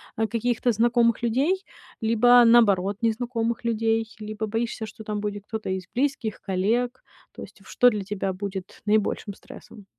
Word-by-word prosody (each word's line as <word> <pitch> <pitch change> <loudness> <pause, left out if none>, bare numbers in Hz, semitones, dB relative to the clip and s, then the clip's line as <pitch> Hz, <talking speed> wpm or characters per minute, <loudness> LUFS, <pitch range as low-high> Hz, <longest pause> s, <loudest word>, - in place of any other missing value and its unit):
а, 220 0 0
каких-то 240 +1 0
знакомых 235 +1 +2
людей 290 - +1 0.4
либо, 240 +2 +5
наоборот, 205 -4 +4
незнакомых 230 0 -1
людей, 225 0 +1
либо 215 0 -5
боишься, 225 +1 -3
что 215 +1 -11
там 210 -1 -3
будет 205 -1 -4
кто-то 220 -3 -5
из 190 -1 -2
близких, 255 -4 -1
коллег? 230 +7 -1 0.3
То - - -9
есть - - -14
что 245 -1 +4
для 210 -3 -3
тебя 195 -1 -3
будет 190 -1 -7
наибольшим 210 -1 0
стрессом? 200 +1 -14
225 Hz, 150 wpm, -25 LUFS, 205-240 Hz, 0.4 s, либо